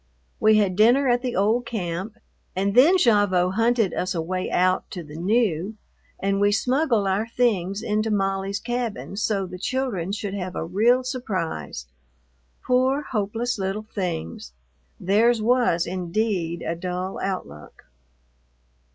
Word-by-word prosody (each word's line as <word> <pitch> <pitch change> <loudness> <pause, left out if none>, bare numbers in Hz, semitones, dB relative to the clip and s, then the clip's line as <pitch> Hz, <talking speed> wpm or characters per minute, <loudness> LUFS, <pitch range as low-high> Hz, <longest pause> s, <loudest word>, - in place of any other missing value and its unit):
We 215 0 +5
had 200 -4 +2
dinner 240 +7 +4
at 245 0 +2
the 250 -2 -3
old 220 +5 +1
camp, 190 -1 -4 0.4
and 195 +2 0
then 285 - +6
Gavotte 205 - +3
hunted 230 -1 +2
us 185 +1 -2
a 165 - 0
way 185 +2 -3
out 185 +1 +1
to 175 - -6
the 150 -1 -11
new, 195 +1 0 0.4
and 195 0 0
we 205 0 +4
smuggled 250 0 +1
our 200 +4 0
things 210 -5 0
into 215 0 0
Molly's 195 -1 -1
cabin 240 -5 -4
so 200 -2 0
the 180 0 -9
children 230 -8 -2
should 205 -1 -4
have 185 -2 -4
a - - -3
real 230 +9 +3
surprise. 185 - -4 0.8
Poor, 260 +3 +2
hopeless 225 +1 -2
little 195 +3 -3
things! 80 - -4 0.5
Theirs 225 +5 +3
was, 235 -6 +2
indeed, 180 -1 -2
a 165 - -2
dull 180 +2 -4
outlook. 130 - -6
200 Hz, 140 wpm, -24 LUFS, 185-230 Hz, 0.8 s, then